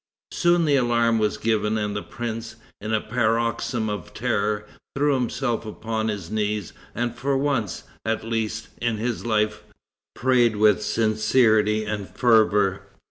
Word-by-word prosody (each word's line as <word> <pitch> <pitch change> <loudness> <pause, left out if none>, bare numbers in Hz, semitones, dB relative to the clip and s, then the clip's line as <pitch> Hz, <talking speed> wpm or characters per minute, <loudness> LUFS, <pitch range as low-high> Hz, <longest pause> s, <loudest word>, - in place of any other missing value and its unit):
Soon 175 -1 +3
the 145 -2 +3
alarm 120 -2 +2
was 105 -1 0
given, 110 -1 0
and 105 -1 -2
the 100 - -2
prince, 115 0 -6 0.3
in 105 +2 -4
a 110 - +2
paroxysm 115 0 0
of 105 -1 -5
terror, 105 0 0 0.3
threw 145 +1 +2
himself 125 -2 -1
upon 110 0 -3
his 100 -5 -4
knees, 105 -3 -2 0.2
and 120 +1 -2
for 135 +2 0
once, 135 - -1 0.2
at 110 0 -1
least, 110 -1 -3
in 120 -2 0
his 115 -2 -3
life, 105 -1 +1 0.5
prayed 120 -3 +3
with 105 -1 +4
sincerity 110 0 +2
and 105 -2 -4
fervor. 105 -5 +3
110 Hz, 140 wpm, -24 LUFS, 105-120 Hz, 0.5 s, with